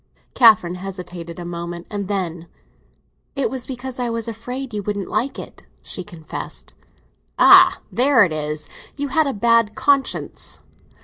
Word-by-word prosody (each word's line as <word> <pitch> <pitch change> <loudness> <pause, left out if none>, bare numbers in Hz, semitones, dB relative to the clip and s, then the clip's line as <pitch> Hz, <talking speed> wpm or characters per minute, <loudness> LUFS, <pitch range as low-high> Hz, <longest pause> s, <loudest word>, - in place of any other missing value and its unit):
Catherine 220 -8 +5
hesitated 180 -3 -7
a 175 - -6
moment, 170 0 -6
and 200 -2 -3
then—"It 185 - -6
was 260 -2 -5
because 260 0 -6
I 245 -1 -1
was 230 -1 -3
afraid 245 +3 -6
you 210 - -2
wouldn't 205 -1 -3
like 270 +3 -1
it!" - - -10 0.2
she 185 - -5
confessed. 165 -3 -8 0.6
"Ah, - - +7
there 255 -2 +5
it 170 -5 0
is! 150 0 -4 0.3
You 285 -1 -3
had 310 +2 +2
a 275 - -1
bad 230 0 +3
conscience." 280 -1 0
210 Hz, 140 wpm, -21 LUFS, 175-250 Hz, 0.6 s, Ah